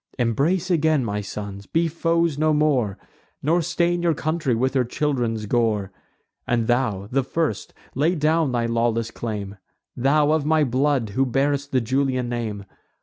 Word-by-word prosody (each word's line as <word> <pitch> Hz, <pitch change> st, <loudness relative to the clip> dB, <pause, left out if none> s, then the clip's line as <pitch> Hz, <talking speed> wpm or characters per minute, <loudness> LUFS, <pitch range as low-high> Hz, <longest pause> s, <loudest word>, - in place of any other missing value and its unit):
Embrace 150 Hz, -, +1 dB
again, 155 Hz, -5 st, +2 dB
my 105 Hz, -1 st, -2 dB
sons, 100 Hz, 0 st, -7 dB
be 165 Hz, +1 st, +1 dB
foes 165 Hz, 0 st, +1 dB
no 155 Hz, +1 st, +2 dB
more; 135 Hz, -10 st, +1 dB, 0.5 s
Nor 165 Hz, +5 st, +2 dB
stain 175 Hz, +1 st, 0 dB
your 170 Hz, -2 st, +2 dB
country 155 Hz, -5 st, -1 dB
with 130 Hz, +3 st, 0 dB
her 130 Hz, -2 st, +2 dB
children's 120 Hz, -4 st, -1 dB
gore! 105 Hz, -4 st, 0 dB, 0.6 s
And 120 Hz, -1 st, +1 dB
thou, 110 Hz, -5 st, 0 dB
the 135 Hz, +2 st, +2 dB
first, 140 Hz, -3 st, -2 dB, 0.2 s
lay 155 Hz, +7 st, +1 dB
down 155 Hz, -1 st, +2 dB
thy 120 Hz, -1 st, 0 dB
lawless 115 Hz, 0 st, 0 dB
claim, 105 Hz, -3 st, -5 dB, 0.4 s
Thou, 145 Hz, +4 st, +3 dB
of 155 Hz, -1 st, +2 dB
my 155 Hz, +1 st, +3 dB
blood, 130 Hz, -2 st, +1 dB
who 130 Hz, +7 st, +1 dB
bear'st 140 Hz, +2 st, 0 dB
the 130 Hz, -, +2 dB
Julian 130 Hz, +1 st, 0 dB
name! 110 Hz, -4 st, -4 dB
135 Hz, 155 wpm, -23 LUFS, 115-155 Hz, 0.6 s, Thou